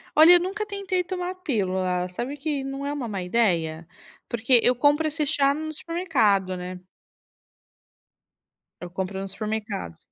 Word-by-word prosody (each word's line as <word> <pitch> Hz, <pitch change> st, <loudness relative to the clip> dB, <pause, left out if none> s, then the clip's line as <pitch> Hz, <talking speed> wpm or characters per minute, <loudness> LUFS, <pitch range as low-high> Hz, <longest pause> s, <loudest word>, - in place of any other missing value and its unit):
Olha, 320 Hz, +3 st, +9 dB
eu 355 Hz, -, +7 dB
nunca 390 Hz, +4 st, -3 dB
tentei 395 Hz, -3 st, -2 dB
tomar 360 Hz, 0 st, -3 dB
a -, -, -8 dB
pílula. 185 Hz, -, -1 dB
Sabe 245 Hz, +10 st, -5 dB
que 290 Hz, -1 st, -2 dB
não 270 Hz, +1 st, -5 dB
é 285 Hz, -, -2 dB
uma 275 Hz, -5 st, -4 dB
má 200 Hz, -4 st, -3 dB
ideia? 170 Hz, -6 st, 0 dB, 0.4 s
Porque 235 Hz, +2 st, +4 dB
eu 250 Hz, -, +4 dB
compro 290 Hz, +5 st, +3 dB
esse 305 Hz, 0 st, -1 dB
chá 280 Hz, -1 st, +3 dB
no 310 Hz, +1 st, -5 dB
supermercado, 255 Hz, -, +1 dB
né? 180 Hz, 0 st, -6 dB, 2.0 s
Eu 175 Hz, -, -6 dB
compro 190 Hz, +1 st, -3 dB
no 195 Hz, -, -4 dB
supermercado. 210 Hz, -, -4 dB
255 Hz, 155 wpm, -25 LUFS, 190-315 Hz, 2.0 s, Olha